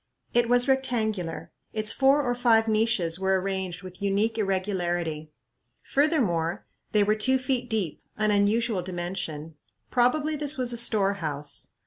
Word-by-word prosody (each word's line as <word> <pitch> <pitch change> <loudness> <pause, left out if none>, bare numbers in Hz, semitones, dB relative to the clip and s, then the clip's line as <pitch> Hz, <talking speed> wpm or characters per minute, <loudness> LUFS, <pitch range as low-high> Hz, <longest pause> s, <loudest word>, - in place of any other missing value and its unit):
It 240 -1 +2
was 245 +1 +4
rectangular. 215 - -1 0.2
Its 215 -1 +1
four 275 +2 +3
or 245 -2 0
five 230 -2 +3
niches 215 -6 +1
were 190 0 +2
arranged 190 -1 -4
with 185 0 -10
unique 200 +3 +1
irregularity. 175 -6 -2 0.5
Furthermore, 225 - 0 0.3
they 210 -1 +4
were 210 +1 +2
two 255 +5 +3
feet 255 -1 -2
deep, 205 -9 -2 0.2
an 215 0 +1
unusual 210 0 +1
dimension. 175 -4 -5 0.3
Probably 290 +5 +2
this 295 0 +2
was 250 -2 0
a - - -2
storehouse. 195 -10 0
210 Hz, 135 wpm, -26 LUFS, 180-245 Hz, 0.5 s, was